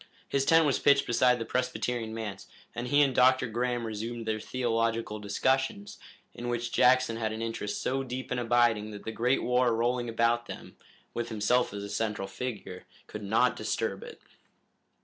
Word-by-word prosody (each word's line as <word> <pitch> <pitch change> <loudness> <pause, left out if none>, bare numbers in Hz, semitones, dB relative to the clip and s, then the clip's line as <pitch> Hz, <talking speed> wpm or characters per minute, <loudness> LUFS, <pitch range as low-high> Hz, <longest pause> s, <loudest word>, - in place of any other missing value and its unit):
His 135 -1 0
tent 165 +1 +5
was 140 - +1
pitched 140 -1 +4
beside 125 +1 +3
the 115 - -4
Presbyterian 125 -2 -2
manse, 105 -4 -6 0.3
and 120 +1 -4
he 145 +3 +5
and 135 -2 +1
Dr. 130 +1 +4
Graham 120 0 -2
resumed 115 +2 -5
their 110 -1 -1
theological 115 -2 -1
discussions, 135 - -1 0.3
in 120 0 -5
which 120 0 -2
Jackson 130 -2 +4
had 110 -1 -1
an 110 +1 -4
interest 110 -3 -4
so 135 +1 0
deep 130 0 -6
and 125 - 0
abiding 120 -3 +2
that 105 -1 -9
the 110 - -3
great 125 +4 +1
war 125 -1 +2
rolling 120 +1 0
about 115 +1 +1
them, - - -9 0.4
with 120 0 -3
himself 115 +3 +1
as 100 0 -6
a - - -5
central 105 -1 -2
figure, 105 -5 -6 0.2
could 105 - -8
not 110 +5 +2
disturb 110 -2 -2
it. - - -10
120 Hz, 175 wpm, -29 LUFS, 110-125 Hz, 0.4 s, tent